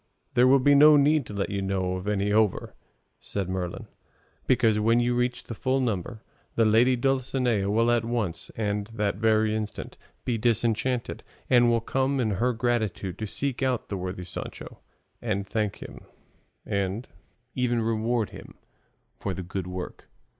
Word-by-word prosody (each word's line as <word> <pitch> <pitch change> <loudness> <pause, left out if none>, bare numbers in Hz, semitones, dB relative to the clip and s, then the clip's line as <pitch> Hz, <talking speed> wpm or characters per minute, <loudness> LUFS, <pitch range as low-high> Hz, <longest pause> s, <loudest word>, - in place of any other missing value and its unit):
"There 125 +1 +5
will 135 +1 +6
be 145 +2 +4
no 150 +1 +8
need 145 -1 +3
to - - -8
let 100 0 -2
you 100 0 -2
know 95 -1 -1
of 95 +2 -5
any 105 0 0
over," 110 -3 +1 0.5
said 100 -3 -4
Merlin, 90 -2 -4 0.6
"because, 115 -4 +3
when 115 +2 +3
you 120 0 +1
reach 125 0 -1
the - - -7
full 130 +4 0
number, 110 -2 -2 0.3
the 115 - +3
lady 115 +4 +4
Dulcinea 125 -5 0
will 115 +3 +3
at 120 -1 +2
once, 115 -7 -2
and 105 -2 -2
that 105 -3 -2
very 110 0 +2
instant, 110 -1 -5 0.3
be 120 -3 -1
disenchanted, 120 +2 0 0.3
and 120 -1 +6
will 115 -1 +2
come 135 +3 0
in 110 -4 +1
her 125 +1 +3
gratitude 110 -6 -1
to 110 - -3
seek 135 +5 -1
out 130 -3 0
the 100 - -2
worthy 90 0 -5
Sancho, 90 - -7 0.4
and 100 -4 -2
thank 105 -1 -2
him, - - -11 0.6
and 100 +4 -2 0.5
even 125 -2 0
reward 115 0 0
him - - -11 0.6
for 95 -2 -3
the 95 - -5
good 90 +1 -5
work. 90 0 -7
110 Hz, 165 wpm, -26 LUFS, 100-125 Hz, 0.6 s, no